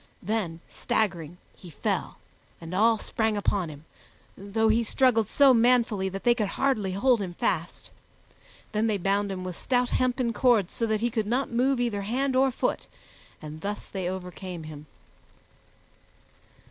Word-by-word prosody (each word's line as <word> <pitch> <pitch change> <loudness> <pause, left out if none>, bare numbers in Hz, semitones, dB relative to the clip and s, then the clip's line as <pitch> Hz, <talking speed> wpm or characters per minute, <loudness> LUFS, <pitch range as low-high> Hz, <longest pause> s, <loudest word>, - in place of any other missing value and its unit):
Then, 185 -5 -2
staggering, 175 -6 -2 0.2
he 180 - -13
fell, 155 - -3 0.4
and 165 +1 -8
all 220 +4 +4
sprang 220 0 -1
upon 200 -4 0
him, 150 +1 -11 0.5
though 210 +3 -1
he 225 +2 +3
struggled 230 -2 +2
so 275 -2 +5
manfully 230 -5 +3
that 195 +1 -7
they 240 - +5
could 220 -4 -1
hardly 215 -9 +1
hold 240 +3 +2
him 180 -3 -5
fast. 170 0 -2 0.8
Then 215 +1 +1
they 215 -2 +1
bound 200 +2 0
him 185 -1 -5
with 185 -1 -5
stout 245 +3 0
hempen 250 -2 0
cords 230 -9 +2
so 230 - -1
that 220 -1 0
he 240 0 0
could 220 -2 -1
not 250 +4 0
move 255 +2 +1
either 235 -5 -1
hand 255 +6 -1
or 265 +1 +4
foot, 255 - -2 0.6
and 155 +1 -8
thus 205 +2 -4
they 185 -3 -4
overcame 180 -2 -6
him. 150 -1 -10
210 Hz, 160 wpm, -27 LUFS, 185-240 Hz, 0.8 s, so